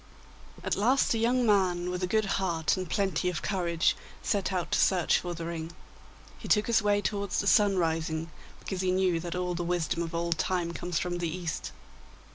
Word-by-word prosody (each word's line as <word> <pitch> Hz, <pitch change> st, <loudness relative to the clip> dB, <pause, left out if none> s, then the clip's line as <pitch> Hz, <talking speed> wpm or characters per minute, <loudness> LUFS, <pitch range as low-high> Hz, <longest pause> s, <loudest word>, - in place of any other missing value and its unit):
At -, -, 0 dB
last 245 Hz, +7 st, +3 dB
a 225 Hz, -, 0 dB
young 245 Hz, +2 st, +2 dB
man, 180 Hz, -4 st, +2 dB
with 180 Hz, 0 st, -3 dB
a 180 Hz, -, 0 dB
good 215 Hz, +3 st, +1 dB
heart 175 Hz, -5 st, 0 dB
and 185 Hz, -3 st, -5 dB
plenty 190 Hz, -2 st, 0 dB
of 180 Hz, -, -4 dB
courage, 170 Hz, -4 st, +1 dB, 0.3 s
set 200 Hz, -3 st, 0 dB
out 180 Hz, -3 st, -2 dB
to -, -, +2 dB
search 180 Hz, -4 st, +3 dB
for 175 Hz, -1 st, -5 dB
the 165 Hz, 0 st, -5 dB
ring. 165 Hz, 0 st, -5 dB, 0.7 s
He -, -, -8 dB
took 210 Hz, 0 st, +3 dB
his 230 Hz, -1 st, +3 dB
way 205 Hz, -1 st, +2 dB
towards 200 Hz, -2 st, -1 dB
the -, -, -1 dB
sunrising, 165 Hz, -6 st, +2 dB, 0.3 s
because 190 Hz, -2 st, -4 dB
he 185 Hz, -, 0 dB
knew 185 Hz, -2 st, +2 dB
that 170 Hz, +1 st, -5 dB
all 180 Hz, 0 st, -1 dB
the 175 Hz, -, -3 dB
wisdom 170 Hz, -1 st, -1 dB
of 165 Hz, 0 st, -4 dB
old 170 Hz, -1 st, -1 dB
time 175 Hz, -2 st, 0 dB
comes 175 Hz, -1 st, -3 dB
from 175 Hz, +1 st, -2 dB
the 170 Hz, -1 st, -1 dB
East. 170 Hz, -1 st, -4 dB
180 Hz, 200 wpm, -29 LUFS, 170-195 Hz, 0.7 s, last